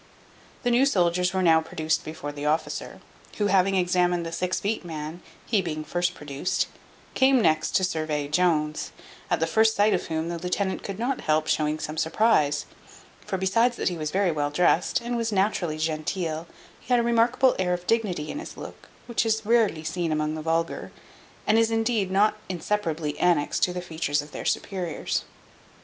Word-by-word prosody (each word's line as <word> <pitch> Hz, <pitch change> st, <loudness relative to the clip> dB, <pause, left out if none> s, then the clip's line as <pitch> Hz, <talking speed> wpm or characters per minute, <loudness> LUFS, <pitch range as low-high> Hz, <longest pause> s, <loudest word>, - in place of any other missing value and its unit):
The 245 Hz, -, +2 dB
new 255 Hz, +3 st, +4 dB
soldiers 180 Hz, -5 st, +2 dB
were 190 Hz, -1 st, 0 dB
now 160 Hz, -2 st, +5 dB
produced 160 Hz, 0 st, -1 dB
before 155 Hz, -2 st, -6 dB
the 145 Hz, 0 st, -4 dB
officer, 155 Hz, +2 st, -2 dB, 0.4 s
who 210 Hz, -, +1 dB
having 195 Hz, 0 st, +4 dB
examined 180 Hz, -1 st, +2 dB
the 165 Hz, -, -5 dB
six 180 Hz, +2 st, -1 dB
feet 215 Hz, +1 st, -2 dB
man, 160 Hz, 0 st, -6 dB, 0.2 s
he 215 Hz, -4 st, +2 dB
being 155 Hz, -3 st, -4 dB
first 175 Hz, +2 st, -1 dB
produced, 145 Hz, +4 st, -2 dB, 0.5 s
came 265 Hz, 0 st, +4 dB
next 155 Hz, -7 st, +2 dB
to 190 Hz, -, +3 dB
survey 155 Hz, -4 st, -1 dB
Jones: 155 Hz, -1 st, +1 dB, 0.4 s
at -, -, +1 dB
the 165 Hz, -, +2 dB
first 220 Hz, +6 st, +3 dB
sight 205 Hz, +1 st, +4 dB
of -, -, -1 dB
whom, 160 Hz, 0 st, -2 dB
the 170 Hz, -1 st, -4 dB
lieutenant 185 Hz, +2 st, -1 dB
could 195 Hz, -1 st, -6 dB
not 250 Hz, +4 st, -1 dB
help 155 Hz, 0 st, +1 dB
showing 155 Hz, 0 st, +1 dB
some 155 Hz, 0 st, -5 dB
surprize; 155 Hz, -5 st, +2 dB, 0.6 s
for 190 Hz, -, -1 dB
besides 230 Hz, +6 st, +2 dB
that -, -, +1 dB
he 175 Hz, -, -4 dB
was 155 Hz, -1 st, -2 dB
very 190 Hz, +1 st, +1 dB
well 145 Hz, -2 st, -1 dB
dressed, 180 Hz, -, +2 dB
and 240 Hz, 0 st, -2 dB
was 230 Hz, -1 st, -1 dB
naturally 190 Hz, -5 st, 0 dB
genteel, 160 Hz, +1 st, -2 dB, 0.3 s
he -, -, -22 dB
had 245 Hz, -, +5 dB
a -, -, +1 dB
remarkable 235 Hz, +2 st, +3 dB
air 180 Hz, -1 st, +1 dB
of 175 Hz, 0 st, -9 dB
dignity 195 Hz, -9 st, 0 dB
in 295 Hz, -, -5 dB
his 330 Hz, -, -9 dB
look, -, -, -10 dB, 0.2 s
which 235 Hz, -1 st, 0 dB
is 220 Hz, -1 st, 0 dB
rarely 220 Hz, -8 st, +2 dB
seen 170 Hz, 0 st, -2 dB
among 155 Hz, 0 st, 0 dB
the 155 Hz, -, -4 dB
vulgar, 165 Hz, +1 st, -1 dB, 0.5 s
and 220 Hz, +1 st, +4 dB
is 225 Hz, 0 st, +3 dB
indeed 225 Hz, -3 st, 0 dB
not 205 Hz, +3 st, +3 dB
inseparably 165 Hz, -5 st, -2 dB
annexed 170 Hz, -5 st, +2 dB
to 180 Hz, -, +3 dB
the 180 Hz, 0 st, -4 dB
features 150 Hz, -4 st, -1 dB
of 150 Hz, -, -14 dB
their -, -, -7 dB
superiors. 180 Hz, -5 st, -2 dB
180 Hz, 185 wpm, -26 LUFS, 155-210 Hz, 0.6 s, now